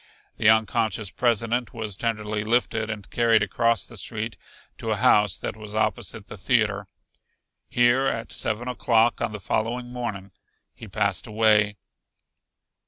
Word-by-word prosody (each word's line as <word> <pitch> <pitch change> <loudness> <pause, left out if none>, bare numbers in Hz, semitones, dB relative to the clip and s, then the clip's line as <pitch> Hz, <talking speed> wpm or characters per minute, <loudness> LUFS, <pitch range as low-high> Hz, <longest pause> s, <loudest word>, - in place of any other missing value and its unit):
The 110 - +4
unconscious 110 -2 +1
President 120 0 0
was 110 -3 -3
tenderly 105 -1 -2
lifted 110 -1 0
and 105 -3 -5
carried 115 -2 +3
across 115 -1 +1
the 120 - -11
street 110 +2 -4 0.4
to 115 - -4
a 110 - +2
house 105 -4 +4
that - - -5
was 105 -1 -9
opposite 110 -1 -1
the 105 - -10
theater. 105 -2 +1 0.8
Here 120 +2 +3
at 115 -3 -3
seven 110 +3 -1
o'clock 120 -2 +2
on 115 -2 -1
the 105 - -6
following 120 +5 -2
morning 100 -6 -5 0.4
he - - -11
passed - - 0
away. 105 -1 +3
110 Hz, 140 wpm, -25 LUFS, 105-120 Hz, 0.8 s, The